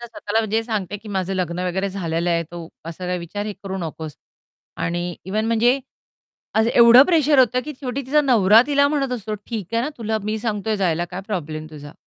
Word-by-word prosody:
तर 240 - -7
स्वतःला 225 -1 -2
जे 220 +1 +1
सांगते 205 -4 -3
की 210 +1 -13
माझं 190 -1 -2
लग्न 180 -1 -2
वगैरे 190 +2 -1
झालेलं 175 -3 -2
आहे. 170 0 +1
तो 170 0 -9 0.2
असा 165 +2 -7
काही 180 0 -1
विचार 205 +5 -5
हे 210 - -3
करू 190 -1 -4
नकोस. 160 -3 -6 0.6
आणि 175 +1 -2
इव्हन 210 +4 -1
म्हणजे 235 +3 +3 0.8
आज 220 +1 +3
एवढं 235 +2 +9
प्रेशर 310 -5 +3
होतं 250 -1 +4
की 300 - -5
शेवटी 270 +1 -3
तिचा 300 +3 +3
नवरा 225 -6 +5
तिला 285 -1 +3
म्हणत 280 -3 -1
असतो, 215 -3 -4
"ठीक 210 -1 -6
आहे 230 - +2
ना, 275 - -1
तुला 220 -1 -1
मी 215 +1 -2
सांगतोय 215 -1 -2
जायला. 175 -4 0
काय 180 +1 -7
प्रॉब्लेम 155 -7 -4
तुझा?" 145 -1 -10
205 Hz, 205 wpm, -21 LUFS, 175-235 Hz, 0.8 s, एवढं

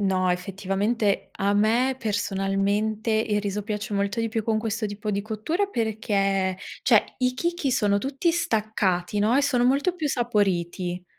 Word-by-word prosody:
No, 185 -2 +2
effettivamente 195 +4 -1
a 200 +1 0
me 235 +5 +2
personalmente 205 +1 0
il 215 -1 +1
riso 205 0 -3
piace 210 0 -4
molto 200 +3 0
di 225 - 0
più 220 -1 -2
con 220 -1 +1
questo 220 0 -2
tipo 205 +1 -4
di 200 0 -1
cottura 220 - -1
perché, 200 - 0 0.3
cioè - - +3
i 250 -1 +1
chicchi 340 -2 -1
sono 205 -3 +2
tutti 275 - 0
staccati, 215 - 0
no, 215 +4 +3
e 280 - +3
sono 250 -4 +2
molto 285 +8 +2
più 310 -3 -2
saporiti. 185 -7 -1
210 Hz, 155 wpm, -25 LUFS, 195-240 Hz, 0.3 s, cioè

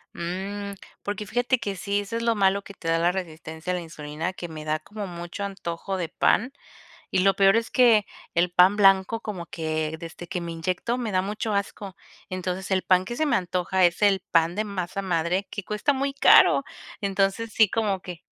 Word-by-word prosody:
Mm, 195 +4 -4 0.3
porque 205 0 -4
fíjate 245 +3 +1
que 205 -4 -3
sí, 200 +3 -1
eso 205 +3 -4
es 230 - -3
lo 230 0 +3
malo 200 -1 +2
que 200 - -11
te 165 - -9
da 165 - +3
la 170 +1 +3
resistencia 160 -2 -5
a - - 0
la 180 - -3
insulina, 160 +2 -5
que 175 - -7
me 155 -2 -8
da 155 0 0
como 210 +3 -7
mucho 175 +2 -6
antojo 190 -1 -4
de 170 -3 -3
pan 240 +9 +2 0.6
y 190 - +2
lo 195 +1 +4
peor 195 +2 +5
es 230 0 -1
que 230 -5 +5 0.3
el 170 +1 +2
pan 180 +3 +5
blanco 195 +2 +4
como 205 -6 -6
que 160 -1 -3
desde 170 +1 -9
que 180 - -3
me 170 -1 -5
inyecto 185 +8 -2
me 235 -4 -3
da 185 -1 +2
mucho 210 +2 -3
asco. 200 -1 -3 0.3
Entonces, 185 +1 -4
el 190 -1 +2
pan 185 0 +3
que 240 - -5
se 310 - +1
me 290 - +2
antoja 180 0 +1
es 175 +2 0
el 200 -2 +4
pan 165 +1 +3
de 215 - 0
masa 195 -2 -4
madre, 180 +1 0
que 205 - -5
cuesta 210 +9 0
muy 275 +1 -1
caro. 280 - +6 0.4
Entonces, 195 +3 0
sí 220 -3 +5
como 205 -4 0
que 180 -3 -8
190 Hz, 210 wpm, -25 LUFS, 175-205 Hz, 0.6 s, caro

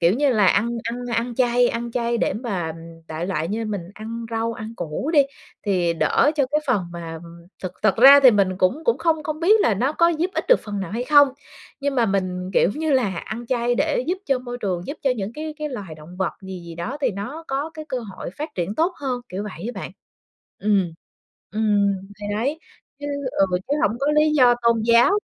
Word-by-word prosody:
Kiểu 170 +1 +4
như 285 +2 +2
là 210 -4 +4
ăn 205 +5 +3 0.2
ăn 230 - -2 0.2
ăn 235 +1 -1
chay 245 0 +3
ăn 235 0 -3
chay 235 -1 0
để - - +1
mà 195 -8 -3 0.4
đại 160 +2 -4
loại 165 -4 -2
như 225 +3 -2
mình 210 -3 -3
ăn 230 +2 -6
rau, 225 0 -1
ăn 220 0 -7
củ 165 - -3
đi, 295 -3 +7 0.4
thì 180 -4 +2
đỡ 225 - +3
cho 280 -3 +3
cái 300 +1 +2
phần 245 -8 +2
mà 165 -1 -6 0.4
thực 185 - -4
thực 215 -2 +3
ra 275 +4 +9
thì 260 -2 +8
mình 200 -4 +3
cũng 220 +13 +1
cũng 470 - +2
không 320 -2 +1
không 310 +1 -4
biết 420 +6 +5
là 220 - +3
nó 255 +9 0
có 335 +1 +4
giúp 340 +2 0
ích - - -1
được - - +6
phần 205 -2 -4
nào 190 -3 -5
hay 235 +4 -2
không, 285 0 +6 0.5
nhưng 280 0 -1
mà 240 -3 +3
mình, 185 -2 -1
kiểu 180 - +4
như 315 -1 -1
là, 220 -9 +1
ăn 230 +6 -6
chay 240 -1 +1
để 290 -2 0
giúp 360 +3 -1
cho 270 -2 +2
môi 245 -1 -7
trường, 180 -5 -3
giúp 285 - -5
cho 270 - +2
những 200 +1 -4
cái 310 +3 -6
cái 305 - -3
loài 200 - -7
động 155 +4 -13
vật 190 -1 -1
gì 190 -1 -7
gì 170 -1 -9
đó 195 +12 -4
thì 265 -3 +2
nó 245 - -6
có 280 +4 -2
cái 310 - -7
cơ 260 - -2
hội 200 -6 -7
phát 305 - -3
triển 180 +3 -2
tốt 330 +8 +1
hơn, 260 -4 -3
kiểu 190 +2 -4
vậy 210 -1 -7
á - - -6
bạn. - - -6 0.7
Ừm. 195 -5 +1 0.6
Ừm, 205 -2 +2 0.3
thì 205 - -5
đấy, 275 +8 -1 0.4
chứ 290 - -5 0.2
ừ, 195 - +3 0.2
chứ 285 - +2
hổng 210 +3 +2
có 275 - 0
lý 305 0 +4
do 255 -5 +5
tôn 235 -1 +3
giáo 235 +7 +5
235 Hz, 230 wpm, -22 LUFS, 195-280 Hz, 0.7 s, ra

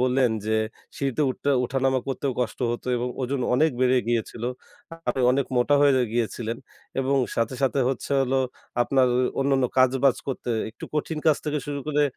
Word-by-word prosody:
বললেন 125 -1 +3 0.2
যে 110 0 +2 0.4
সিঁড়িতে 140 +1 -1
উঠতে 140 +2 -2
উঠানামা 130 +1 +1
করতেও 135 0 -1
কষ্ট 115 -4 -2
হতো 120 - -5
এবং 120 +1 -1
ওজন 130 +1 -1
অনেক 155 +4 +4
বেড়ে 130 0 +4
গিয়েছিলো। 120 0 -1 0.6
আপনি 130 - 0
অনেক 135 0 +1
মোটা 125 +4 +3
হয়ে 145 -1 +6 0.2
গিয়েছিলেন 115 0 -2 0.4
এবং 135 +1 +1 0.2
সাথে, 115 +3 0
সাথে 135 +1 +2
হচ্ছে 135 +1 -3
হলো 135 0 +1 0.4
আপনার 130 +1 +3 0.3
অন্যান্য 135 -1 +2
কাজ-বাজ 130 +1 +4
করতে 130 -2 -3 0.2
একটু - - -10
কঠিন 155 +1 -2
কাজ 155 - +5
থেকে 150 -1 -1
শুরু 145 -1 -3
করে 150 -1 +2
130 Hz, 165 wpm, -25 LUFS, 125-140 Hz, 0.6 s, হয়ে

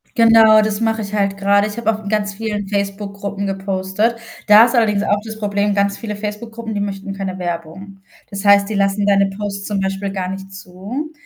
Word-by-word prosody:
Genau, 225 -1 +6
das 215 0 -2
mache 225 0 0
ich 200 0 -7
halt 200 -1 0
gerade. 200 +1 +2
Ich 210 +2 -8
habe 225 -1 +1
auch 215 0 -8
in 200 - -5
ganz 205 -2 -1
vielen 210 -1 -4
Facebook-Gruppen 200 0 -3
gepostet. 195 +3 -1 0.3
Da 215 +2 +8
ist 240 - -1
allerdings 210 -3 +2
auch 205 0 +1
das 220 -1 -8
Problem, 205 0 0
ganz 200 0 +1
viele 210 -3 -5
Facebook-Gruppen, 220 +2 -6
die 205 - -2
möchten 195 0 -4
keine 195 -1 -5
Werbung. 175 +3 -6 0.3
Das 200 0 -6
heißt, 200 0 +5
die - - -3
lassen 200 +1 +1
deine 200 -1 +3
Posts 200 0 -5
zum 205 -2 -1
Beispiel 195 +1 -2
gar 185 -2 -3
nicht 195 0 -7
zu. 195 - -7
200 Hz, 205 wpm, -18 LUFS, 195-215 Hz, 0.3 s, Da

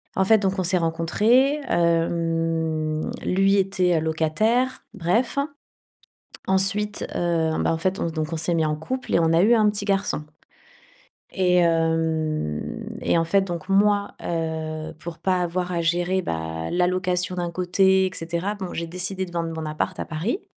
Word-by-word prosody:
En 190 - +2
fait 220 +3 +6
donc 190 -1 -1
on - - +1
s'est 180 +1 +2
rencontrés, 210 - +2
hem, 165 -2 0 0.2
lui 195 +2 +3
était, 185 -3 +2
heu - - 0
locataire, 215 +12 0
bref. 205 +8 0 1.1
Ensuite, 200 +2 +2
heu 165 -2 +1
bah, - - +1
en 160 - -1
fait 185 +3 -1
on - - 0
donc, 160 -1 -3
on - - -1
s'est 170 +2 0
mis 160 -1 +2
en 150 - 0
couple 255 +12 -4
et - - +4
on 165 0 +2
a 165 +2 +4
eu 230 +4 +5
un 215 -2 +4
petit 205 0 -4
garçon. 195 -6 0 1.1
Et 180 -2 +3
hem 160 - 0 0.2
et - - +2
en 165 - +1
fait 195 +4 +3
donc 175 -3 -5
moi, 200 +1 +3
heu, 160 -1 -3
pour 170 -1 -7
pas 185 -1 +1
avoir 180 +1 -2
à 170 -1 -1
gérer, 175 +3 +1
bah 80 - -4
la 180 0 +2
location 180 0 0
d'un 175 -1 -2
côté 190 +2 +3
et - - -6
cetera, 170 +4 -3
bon, 190 -3 -6
j'ai 170 - -3
décidé 185 +2 -2
de 175 - -13
vendre 165 -1 -2
mon 155 - -4
appart 155 0 -3
à - - -2
Paris. 185 - -3
175 Hz, 175 wpm, -23 LUFS, 165-190 Hz, 1.1 s, fait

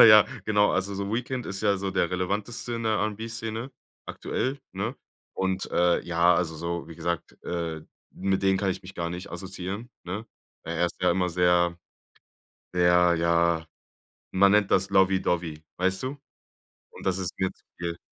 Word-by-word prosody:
aber - - +12
ja, 110 -1 +10 0.2
genau. 105 -1 +4
Also, 100 +1 0
so 100 +1 -3
Weekend 125 +1 -2
ist 95 -1 -4
ja 100 -2 +3
so 95 0 -2
der - - +1
relevanteste 100 +6 -2
in 115 - -3
der 110 -1 +2
R'n'B-Szene 115 +3 -3 0.3
aktuell, 135 +2 -2
ne? 105 +7 -2 0.4
Und, 95 0 -1
äh, 90 0 +3
ja, 85 +1 +4
also, 85 -2 0
so, 85 +1 -3
wie 85 - -10
gesagt, 85 +1 -3
äh, 85 -2 -3 0.3
mit 95 0 0
den 95 0 +4
kann 100 -1 +1
ich - - -3
mich 95 +1 -10
gar 85 -1 -2
nicht 90 +1 -6
assoziieren, 95 +5 -5
ne? 95 +6 -4 0.4
Er 85 +1 0
ist - - -6
ja 90 - +5
immer 90 0 +2
sehr, 85 0 +3 1.0
sehr, 90 -1 +5
ja, 85 -1 +2 0.7
man 100 +1 +5
nennt 105 -1 +4
das 95 +1 +3
Lobby 95 0 +4
Dobby, 80 -3 -1
weißt 95 +4 +1
du? 135 +3 -3 0.7
Und - - -12
das 95 -1 +1
ist 90 -2 -4
mir 95 -1 0
zu - - -32
viel. 85 -1 -3
95 Hz, 175 wpm, -27 LUFS, 85-105 Hz, 1.0 s, aber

